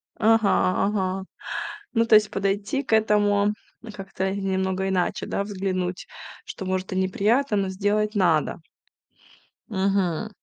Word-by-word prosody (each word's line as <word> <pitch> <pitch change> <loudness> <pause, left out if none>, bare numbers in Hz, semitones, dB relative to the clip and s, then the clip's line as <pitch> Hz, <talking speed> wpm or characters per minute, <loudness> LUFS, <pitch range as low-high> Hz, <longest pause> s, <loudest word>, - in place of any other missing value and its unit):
Ага, 220 -1 +3 0.4
ага. 190 -2 -1 0.7
Ну, 230 -1 +3
то 230 - +5
есть 210 0 +5
подойти 200 +7 -1
к 245 - -3
этому 210 -1 +3 0.4
как-то 195 -1 -4
немного 190 -1 -1
иначе, 185 -2 -1
да, 200 - -2
взглянуть, 185 -2 -3 0.4
что, 190 - -7
может, 185 0 -2
и - - -3
неприятно, 210 +6 +1
но 195 -1 0
сделать 210 +3 0
надо. 165 -7 +2 1.1
Мгм. 195 -1 0
195 Hz, 120 wpm, -24 LUFS, 190-210 Hz, 1.1 s, то